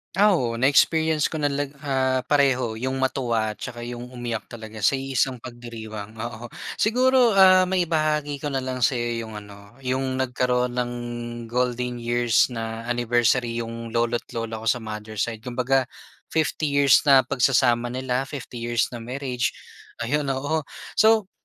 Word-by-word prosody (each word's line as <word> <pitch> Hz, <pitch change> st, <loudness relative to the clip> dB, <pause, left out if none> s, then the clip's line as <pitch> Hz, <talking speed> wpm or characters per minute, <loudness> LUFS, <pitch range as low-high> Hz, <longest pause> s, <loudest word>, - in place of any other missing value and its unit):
Ah, 205 Hz, -1 st, +5 dB
oo. 115 Hz, -7 st, -1 dB
Na-experience 155 Hz, +4 st, +3 dB
ko 160 Hz, -, -3 dB
na 145 Hz, -, +2 dB
lag 140 Hz, 0 st, -2 dB, 0.2 s
ah, 130 Hz, -1 st, +1 dB
pareho 130 Hz, -5 st, +2 dB
'yong 130 Hz, +3 st, -2 dB
matuwa 120 Hz, -5 st, 0 dB
tsaka 120 Hz, +1 st, -7 dB
'yong 120 Hz, +1 st, -7 dB
umiyak 120 Hz, -3 st, -4 dB
talaga 110 Hz, -2 st, -8 dB
sa 135 Hz, +6 st, +3 dB
iisang 135 Hz, -1 st, 0 dB
pagdiriwang, 110 Hz, -3 st, -8 dB
oo. 120 Hz, +1 st, -6 dB, 0.2 s
Siguro, 250 Hz, +2 st, +4 dB
ah, 190 Hz, -2 st, +7 dB
maibahagi 155 Hz, -5 st, 0 dB
ko 145 Hz, -, -2 dB
na 135 Hz, -, 0 dB
lang 130 Hz, -1 st, -3 dB
sa'yo 120 Hz, -2 st, 0 dB
'yong 110 Hz, -1 st, -7 dB
ano, 100 Hz, +3 st, -15 dB
'yong 130 Hz, 0 st, -2 dB
nagkaroon 125 Hz, -1 st, 0 dB
ng 125 Hz, -1 st, -1 dB, 0.6 s
golden 125 Hz, +1 st, -1 dB
years 120 Hz, 0 st, +2 dB
na 115 Hz, -1 st, -5 dB
anniversary 120 Hz, 0 st, +1 dB
'yong 115 Hz, 0 st, -7 dB
lolo't 120 Hz, 0 st, 0 dB
lola 115 Hz, -1 st, -3 dB
ko 110 Hz, -, -6 dB
sa 120 Hz, +1 st, +1 dB
mother's 110 Hz, -1 st, -4 dB
side, 115 Hz, -2 st, -4 dB
kumbaga, 125 Hz, +2 st, 0 dB, 0.4 s
50 155 Hz, -1 st, 0 dB
years 140 Hz, -3 st, +5 dB
na 135 Hz, -2 st, +7 dB
pagsasama 120 Hz, -2 st, +2 dB
nila, 130 Hz, +1 st, -2 dB
50 130 Hz, -4 st, -7 dB
years 120 Hz, 0 st, 0 dB
na 120 Hz, -, -6 dB
marriage, 125 Hz, +1 st, -3 dB, 0.5 s
ayun, 145 Hz, +4 st, 0 dB
oo. 140 Hz, +4 st, 0 dB, 0.4 s
So, 220 Hz, -2 st, +4 dB
125 Hz, 150 wpm, -24 LUFS, 115-140 Hz, 0.6 s, ah